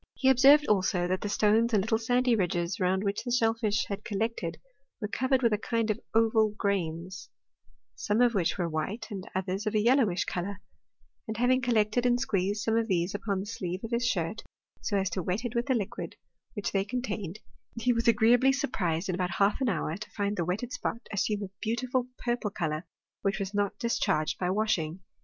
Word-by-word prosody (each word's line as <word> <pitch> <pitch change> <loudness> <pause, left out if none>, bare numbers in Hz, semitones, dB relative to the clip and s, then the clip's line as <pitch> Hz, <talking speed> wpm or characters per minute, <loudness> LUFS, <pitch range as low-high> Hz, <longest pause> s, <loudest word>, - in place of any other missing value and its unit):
He 265 - +3
observed, 275 +4 +7
also, 185 -3 +2
that 185 +1 -1
the 205 - -3
stones 220 +3 +3
and 195 - +3
little 220 +1 +1
sandy 245 +1 +2
ridges 175 -3 -1
round 190 +1 +1
which 200 0 -1
the 245 - -4
shellfish 225 -3 +1
had 200 +1 -5
collected 205 -6 -2 0.4
were 210 - -2
covered 260 +4 +1
with 230 -2 +4
a 210 - +1
kind 230 -1 0
of 210 - -3 0.2
oval 220 -2 +3
grains, 185 -2 -2 0.6
some 210 +2 -1
of 245 -1 +4
which 185 -4 +1
were 175 -3 0
white, 165 +9 -4
and 195 -2 -6
others 190 +3 -2
of 215 - -1
a - - +4
yellowish 230 -5 +3
colour, 190 +2 -4 0.7
and 220 0 -4
having 255 +2 +3
collected 240 0 +2
and 245 0 +3
squeezed 205 -4 0
some 225 -1 +1
of 230 -1 +1
these 180 -2 0
upon 200 -2 -2
the - - -6
sleeve 185 -3 -4
of 225 - -5
his 235 +1 +1
shirt, 175 -2 -1 0.4
so 205 - 0
as 195 0 +1
to 185 - -2
wet 185 +8 -2
it 240 - -3
with 235 +1 -1
the 260 - +2
liquid 205 -5 -4 0.4
which 205 - -2
they 195 -1 +1
con 245 +5 -3
tained, 200 -7 -4 0.4
he 245 +2 +2
was 230 0 -1
agreeably 235 +4 +5
surprised 180 -10 -1
in 185 - -1
about 180 0 -2
half 200 +5 +2
an 260 - +2
hour 165 -4 -1
to 210 +3 -8
find 205 0 -2
the 175 - 0
wetted 215 +8 -3
spot 235 -2 -4
assume 205 +1 0
a 195 - -6
beautiful 245 +2 -1
purple 240 -3 -1
colour, 160 -4 -3 0.3
which 195 0 0
was 195 -1 -4
not 205 -1 0
discharged 230 -10 0
by 180 - 0
washing. 185 -4 0
210 Hz, 205 wpm, -29 LUFS, 190-235 Hz, 0.7 s, observed